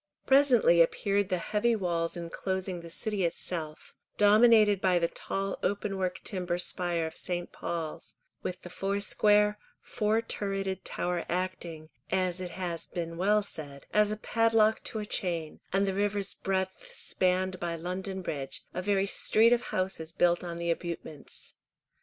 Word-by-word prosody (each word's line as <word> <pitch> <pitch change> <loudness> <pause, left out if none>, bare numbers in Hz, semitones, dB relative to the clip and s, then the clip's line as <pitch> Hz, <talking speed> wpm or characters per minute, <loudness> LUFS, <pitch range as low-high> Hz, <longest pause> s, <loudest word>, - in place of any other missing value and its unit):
Presently 255 -11 +5
appeared 200 +4 +2
the 185 - +1
heavy 215 +6 +1
walls 170 -4 -1
inclosing 185 +1 -3
the 170 - -10
City 205 +2 -2
itself, 165 -2 -4 0.2
dominated 210 -1 +6
by 185 -2 +3
the 170 -1 +2
tall 195 +3 -3
openwork 195 -2 -1
timber 180 -3 -2
spire 175 -2 0
of 160 - -6
St. 175 -1 -3
Paul's, 165 -2 -5 0.3
with 180 0 -5
the 175 - -9
foursquare, 210 +2 +2 0.2
four 215 0 0
turreted 195 -3 -2
Tower 175 -1 -2
acting, 175 -3 -3 0.2
as 185 -1 +1
it 180 - -4
has 175 -2 -4
been 165 -1 -4
well 205 +4 +3
said, 145 -7 -8
as 210 0 +4
a 215 - -2
padlock 225 0 +3
to - - -2
a 210 - -3
chain, 170 -6 -3
and 195 +1 +2
the 195 - 0
river's 200 0 0
breadth 190 -1 -3
spanned 185 0 0
by 170 -1 -2
London 185 +3 -4
bridge, 140 -5 -4
a 180 - -2
very 195 0 +2
street 225 +3 +4
of 240 0 0
houses 185 -4 -2
built 175 +1 +2
on 170 -1 -5
the 170 0 0
abutments. 165 -3 -5
185 Hz, 150 wpm, -29 LUFS, 170-205 Hz, 0.3 s, dominated